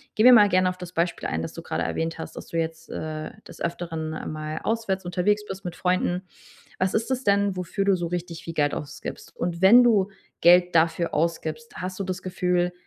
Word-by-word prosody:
gehen 220 +2 +3
wir 255 - +10
mal 205 -3 +7
gerne 185 -1 +3
auf 180 - -5
das 180 0 -9
Beispiel 170 +1 -1
ein, 80 +1 -2
das 80 - -5
du - - -7
grade 80 +1 -2
erwähnt 160 - -2
hast, 160 - -7
dass - - -8
du 165 - -4
jetzt, 165 0 -3
äh, 155 0 -5 0.2
des - - -13
Öfteren 165 -2 -3 0.2
mal 155 0 -4
auswärts 210 -5 -1
unterwegs 205 +4 +1
bist 195 -1 -7
mit 175 0 -4
Freunden. 180 0 0 0.6
Was 185 0 0
ist 225 +4 0
das 260 0 0
denn, 200 -1 +2
wofür 180 +2 -2
du 195 -2 +4
so 175 -1 -3
richtig 175 -1 -5
viel 165 - -6
Geld 145 -2 +1
ausgibst? 150 +3 -7
Und 170 +1 -3
wenn 235 +6 +9
du 205 -4 +3 0.3
Geld 175 0 +6
dafür 165 +1 +2
ausgibst, 165 +7 -2
hast 185 +1 -5
du - - 0
das 185 0 -4
Gefühl, 180 -1 0
180 Hz, 215 wpm, -25 LUFS, 165-190 Hz, 0.6 s, wir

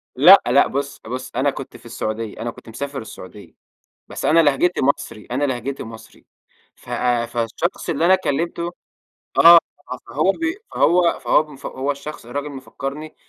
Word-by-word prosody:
لأ، 180 +9 +8
لأ، 130 +4 +4
بُص، 140 +1 -4
بُص 130 +3 -6
أنا 135 +3 +2
كنت 135 -1 -8
في - - -21
السعودية، 110 -1 -5
أنا 120 +1 -3
كنت 115 - -15
مسافر 140 +4 -5
السعودية 105 -2 -12 0.5
بس - - -7
أنا 165 +2 +5
لهجتي 160 +3 +2
مصري، 140 -6 -1
أنا 130 +4 0
لهجتي 130 0 -3
مصري، 110 -1 -13 0.5
ف - - -21
آآ، 120 -1 0
فالشخص 120 +11 -3
اللي 160 0 0
أنا 185 - +6
كلمته 170 0 -2 0.7
آه 170 0 +10 0.5
فهو 155 +11 +1
بي 330 - -3 0.2
فهو 175 0 +3
فهو 150 -2 +1 0.2
هو 135 +2 -1
الشخص 145 -2 -7
الراجل 140 +4 -4
مفكرني 140 +2 -7
140 Hz, 155 wpm, -21 LUFS, 120-155 Hz, 0.7 s, آه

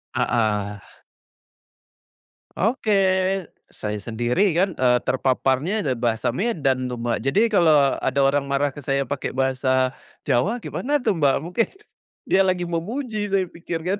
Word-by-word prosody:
Heeh. 105 -3 0 1.7
Oke, 220 +3 -1 0.8
saya 105 0 -4
sendiri 120 - 0
kan, 180 +1 +1
eee, 125 -1 +3
terpaparnya 135 +9 +1
ada 135 -7 0
bahasa 115 -1 0
Medan 135 - 0
tuh, 125 -1 -4
Mbak. 120 -1 0
Jadi 135 +10 +2
kalau 155 -9 +4
ada - - -1
orang 140 +1 +2
marah 140 +1 0
ke 145 +1 -11
saya 135 -1 0
pakai 145 - -3
bahasa 130 0 +1 0.4
Jawa 205 - +1
gimana 290 +6 -1
tuh, 215 -7 0
Mbak? 140 -3 +3
Mungkin 180 +8 0 0.6
dia 195 0 +4
lagi 180 -2 0
memuji 215 +6 -3
saya 190 -2 +1
pikir 170 -1 -5
kan. 190 +4 -2
145 Hz, 135 wpm, -23 LUFS, 130-190 Hz, 1.7 s, kalau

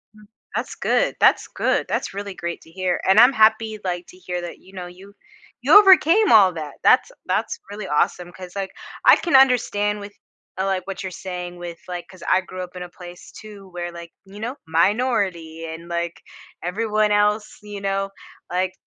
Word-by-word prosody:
Mm, 210 0 -17 0.3
that's - - -3
good, - - +1
that's - - +4
good, - - +1
that's - - -2
really 200 -1 -5
great 170 -1 -5
to 160 - -18
hear, 185 0 -1
and 195 +3 +6
I'm 250 +3 +7
happy, 220 -1 +3
like, 175 -1 -3
to 180 - -15
hear 180 -1 -5
that, 175 - -8
you 190 +1 -19
know, 180 -1 -7
you 190 +3 -14 0.5
you 415 - +8
overcame 385 +1 +5
all 195 -4 +7
that. 155 -3 -6
That's 265 - +4 0.2
that's 470 - -1
really 205 -1 -7
awesome, 175 +4 0
'cause, 180 +1 -11
like, 195 -1 -4 0.3
I - - +9
can 340 -6 0
understand 220 -6 +3
with, 205 0 -9 0.5
uh, 190 - -1
like, 190 -1 -2
what 195 0 -5
you're 185 - -5
saying 180 -1 -6
with, 175 -1 -7
like, 175 -1 -6
'cause 185 -2 -14
I 185 - +3
grew 185 0 -7
up 180 0 -11
in 180 - -7
a 180 - -7
place, 175 0 -12
too, 205 -3 -12
where, 175 0 -5
like, 170 -1 -10
you 200 +2 -12
know, 240 +5 -4
minority 170 -3 0
and, 165 +1 -8
like, 170 0 -3 0.4
everyone 210 +3 0
else, 210 +1 +1
you 205 -1 -8
know, 195 0 -1 0.4
like, 185 +1 -1
190 Hz, 195 wpm, -22 LUFS, 175-210 Hz, 0.5 s, I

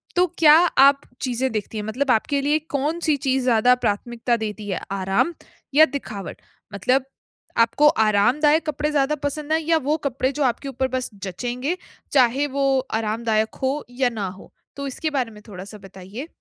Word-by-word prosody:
तो 360 0 +4
क्या 300 -2 +7 0.3
आप 275 +1 +6 0.2
चीज़ें 255 +1 -1
देखती 215 0 -4
हैं 210 - -3
मतलब 255 +5 0
आपके 275 +5 +1
लिए 295 +2 +2 0.2
कौन-सी 310 +3 0
चीज़ 265 -1 0
ज़्यादा 245 0 +4
प्राथमिकता 235 +3 0
देती 215 -1 -5
हैं, 190 - -1
आराम 195 - 0 0.4
या 310 +3 +8
दिखावट? 220 - -7 0.3
मतलब 255 +7 +1 0.5
आपको 230 +6 +4 0.2
आरामदायक 295 +10 +3
कपड़े 300 0 -1
ज़्यादा 290 0 +1
पसंद 300 +1 -5
है 320 - +2
या 325 +1 +3
वो 305 - +2
कपड़े 260 0 -1
जो 290 +1 -2
आपके 260 +2 -1
ऊपर 265 0 -1
बस 255 - -3
जचेंगे, 245 - -3 0.3
चाहे 265 +1 +3
वो 275 -1 +3 0.2
आरामदायक 220 0 -1
हो 275 +3 -1
या 250 0 +1
ना 215 -5 -4
हो? 185 +1 -11 0.2
तो 280 0 -5
इसके 310 +4 -3
बारे 260 -6 -2
में 210 -1 -14
थोड़ा-सा 200 +1 -8
बताइए। 195 - -9
255 Hz, 170 wpm, -22 LUFS, 220-285 Hz, 0.5 s, या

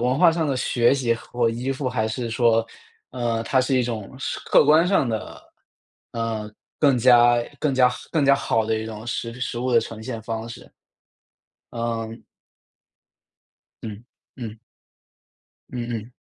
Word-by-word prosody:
文 125 +2 +1
化 175 -2 +7
上 160 -2 0
的 135 -2 0
学 120 0 +2
习 125 -4 +1
和 - - -12
或 115 - +4
依 125 +4 -2
附， 135 0 -3
还 110 -3 -1
是 115 +1 -3
说， 115 -1 +3 0.5
呃， 120 -2 -1
它 130 +3 +2
是 130 +1 +1
一 125 - +3
种 115 -1 -5
实 - - -3
客 - - +5
观 160 +3 +5
上 180 -10 +2
的， 110 -1 -5 0.7
呃， 115 -2 -3 0.3
更 140 -4 +4
加 120 0 +6 0.2
更 145 -3 0
加 125 -1 +5
好 125 - -5 0.2
更 155 -4 +2
加 140 0 +6
好 115 -5 0
的 110 0 0
一 110 - -5
种 110 -1 -8
食 115 0 -3
品 125 - -12
食 120 - -3
物 125 +1 -1
的 115 - +6
呈 110 -1 -7
现 115 -2 -5
方 115 +1 -4
式， 115 - -11 1.0
嗯 115 -1 -4 1.6
嗯， 110 +1 -7 0.3
嗯。 115 -3 -7 1.1
嗯 120 -1 -4
嗯。 115 +1 -5
120 Hz, 180 characters per minute, -23 LUFS, 115-130 Hz, 1.6 s, 化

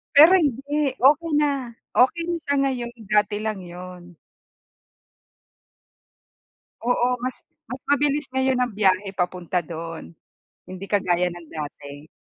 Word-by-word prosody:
Pero 320 +6 +9
hindi. 285 -2 +1
Okey 300 +6 +4
na, 275 -5 0 0.2
okey 265 +7 +4
na 345 - 0
siya 285 - 0
ngayon, 250 -3 -1 0.2
dati 210 0 +2
lang 215 -2 -3
yun. 180 0 -10 2.7
Oo, 245 0 +3 0.2
mas 255 0 -2 0.3
mas 255 +1 -6
mabilis 290 0 +2
ngayon 265 -1 +1
ang 245 -3 0
biyahe 195 -1 +2
papunta 180 -1 -1
do'n, 165 0 -7 0.6
hindi 185 +1 -7
kagaya 180 -3 +1
ng 175 -1 -10
dati. 145 0 -8
215 Hz, 120 wpm, -23 LUFS, 180-275 Hz, 2.7 s, Pero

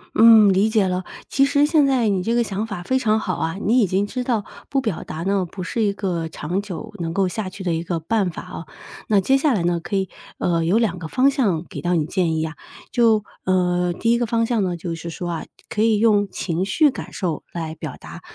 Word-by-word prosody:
嗯， 220 -2 +8
理 195 +3 +3
解 215 -4 +2
了。 180 0 -2 0.2
其 275 - +3
实 285 +1 +3
现 300 -2 +4
在 250 -5 +2
你 195 -2 +1
这 230 +6 0
个 240 - +3
想 210 0 -3
法 200 -5 -6
非 260 +7 +1
常 220 -3 +2
好 185 -5 -2
啊， 165 +2 -2
你 235 +5 +4
已 210 - +3
经 190 +3 +1
知 250 +4 -4
道 230 -5 0 0.2
不 275 -1 0
表 220 -9 -3
达 160 +2 -5
呢， 195 0 +1
不 185 - -6
是 225 +5 -1
一 205 -1 +1
个 180 -4 -2
长 165 +4 -3
久 200 -1 -7
能 165 -1 -3
够 190 0 +1
下 195 0 -4
去 190 +1 -9
的 175 -2 0
一 165 - -1
个 170 0 -2
办 200 +2 0
法 170 - -7
啊。 165 - -8 0.4
那 205 -2 +3
接 270 +7 +3
下 285 0 +2
来 195 -7 0
呢， 170 0 +1
可 185 - -5
以 190 -2 0 0.3
呃， 165 -2 0
有 180 +6 +3
2 215 -6 0
个 160 - -6
方 260 - +3
向 200 - 0
给 - - -6
到 175 0 +1
你 155 -3 +1
建 170 -1 0
议 160 - 0
啊。 160 0 -4 0.4
就 225 -3 +3 0.2
呃， 180 -1 +1
第 230 +6 0
一 235 - +4
个 240 - 0
方 230 0 +1
向 230 -2 0
呢， 180 -1 -1
就 170 0 -4
是 170 +1 -7
说 175 +1 -5
啊， 165 - -4 0.2
可 210 - -1
以 220 -1 +4
用 205 -2 +3
情 180 -1 -2
绪 290 +9 +3
感 - - -8
受 170 -6 -3
来 165 -2 -4
表 155 - -6
达， - - -11
195 Hz, 270 characters per minute, -22 LUFS, 175-230 Hz, 0.4 s, 嗯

